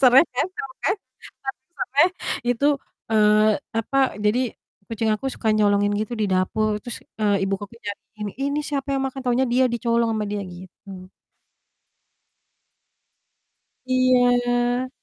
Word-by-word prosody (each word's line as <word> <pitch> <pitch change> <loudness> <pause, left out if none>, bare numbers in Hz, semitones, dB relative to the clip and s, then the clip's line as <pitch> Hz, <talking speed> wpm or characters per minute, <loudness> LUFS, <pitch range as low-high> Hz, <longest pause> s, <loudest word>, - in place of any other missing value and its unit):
Sereh 265 +4 +7
kan, 255 - +1
tahu 270 - -6
kan? 390 - +3
Tau - - -46 0.8
sereh? 290 +7 +5 0.4
Itu, 245 +4 +2 0.4
eee, 215 0 +5 0.3
apa, 250 +5 -2 0.3
jadi 220 +5 +3 0.5
kucing 225 0 -1
aku 270 +5 -2
suka 220 -4 0
nyolongin 205 -1 +3
gitu 220 +3 -4
di 215 - +1
dapur. 210 +3 +1
Terus, 240 - -6 0.2
eee, 200 -2 +2
ibu 195 - -1
ko 205 - -5
ku 235 - -16
nyariin 210 0 -8
nih, - - -32
"Ini 290 - -1
siapa 285 -1 -3
yang 270 - 0
makan?" 270 0 -4
Taunya 250 +2 +2
dia, 250 +2 +3
dicolong 235 -1 +1
sama 215 -1 -1
dia 205 0 -3
gitu. 185 +1 -11 2.8
Iya. 245 -1 +2
230 Hz, 140 wpm, -23 LUFS, 210-255 Hz, 2.8 s, Sereh